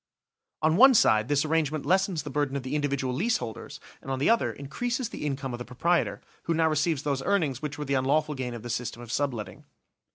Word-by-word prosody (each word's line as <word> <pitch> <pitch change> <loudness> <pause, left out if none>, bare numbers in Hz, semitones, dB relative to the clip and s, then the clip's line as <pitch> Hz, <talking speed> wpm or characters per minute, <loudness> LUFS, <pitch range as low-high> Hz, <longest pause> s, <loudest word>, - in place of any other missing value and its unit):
On 160 +2 +3
one 265 +3 +8
side 110 - +4
this 145 +1 +2
arrangement 155 -2 0
lessens 190 -4 +1
the 145 - -6
burden 145 -1 -1
of 135 - -5
the 130 +2 -5
individual 140 -3 -1
lease 220 - +1
holders, 110 - -7 0.2
and - - -10
on 135 - -1
the 140 +11 +3
other 230 - +2
increases 240 - -3
the - - -7
income 135 -2 -3
of 120 - -5
the - - -4
proprietor, 165 +8 0 0.2
who 165 - 0
now 160 0 +3
receives 155 -1 0
those 140 -2 -1
earnings 155 -8 0
which 150 -2 -4
were 150 - -4
the 140 - -1
unlawful 140 +3 +1
gain 125 -3 -4
of 115 - -8
the 120 - -6
system 120 0 -4
of 115 - -9
subletting. 125 -5 -3
145 Hz, 225 wpm, -27 LUFS, 130-160 Hz, 0.2 s, one